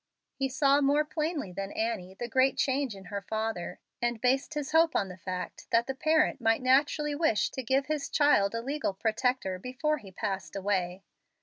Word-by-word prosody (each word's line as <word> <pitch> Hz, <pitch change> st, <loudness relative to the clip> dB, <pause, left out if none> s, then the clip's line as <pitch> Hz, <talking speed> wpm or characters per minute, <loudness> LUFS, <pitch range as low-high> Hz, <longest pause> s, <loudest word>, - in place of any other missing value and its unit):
He 270 Hz, -1 st, -2 dB
saw 275 Hz, +2 st, +3 dB
more 290 Hz, +2 st, +3 dB
plainly 305 Hz, -, -2 dB
than 195 Hz, +2 st, -5 dB
Annie 215 Hz, -5 st, -2 dB
the 240 Hz, -, -5 dB
great 260 Hz, +3 st, +2 dB
change 265 Hz, -4 st, 0 dB
in 195 Hz, -1 st, -12 dB
her 200 Hz, -, -2 dB
father, 220 Hz, -2 st, -3 dB, 0.2 s
and 240 Hz, -1 st, 0 dB
based 265 Hz, +5 st, +1 dB
his 295 Hz, -2 st, -3 dB
hope 325 Hz, 0 st, +4 dB
on 195 Hz, -, +1 dB
the 180 Hz, -, -9 dB
fact 185 Hz, -1 st, -6 dB
that 230 Hz, 0 st, +3 dB
the 270 Hz, -, -3 dB
parent 310 Hz, -1 st, +2 dB
might 225 Hz, +2 st, +2 dB
naturally 290 Hz, +3 st, +3 dB
wish 290 Hz, -8 st, +1 dB
to 260 Hz, -, -4 dB
give 265 Hz, +3 st, +1 dB
his 295 Hz, -1 st, -2 dB
child 230 Hz, -9 st, +3 dB
a 230 Hz, -, -3 dB
legal 280 Hz, -6 st, -2 dB
protector 220 Hz, -3 st, 0 dB
before 280 Hz, +7 st, -1 dB
he 200 Hz, -5 st, -12 dB
passed 190 Hz, -4 st, -4 dB
away. 190 Hz, -2 st, -1 dB
250 Hz, 190 wpm, -29 LUFS, 200-285 Hz, 0.2 s, hope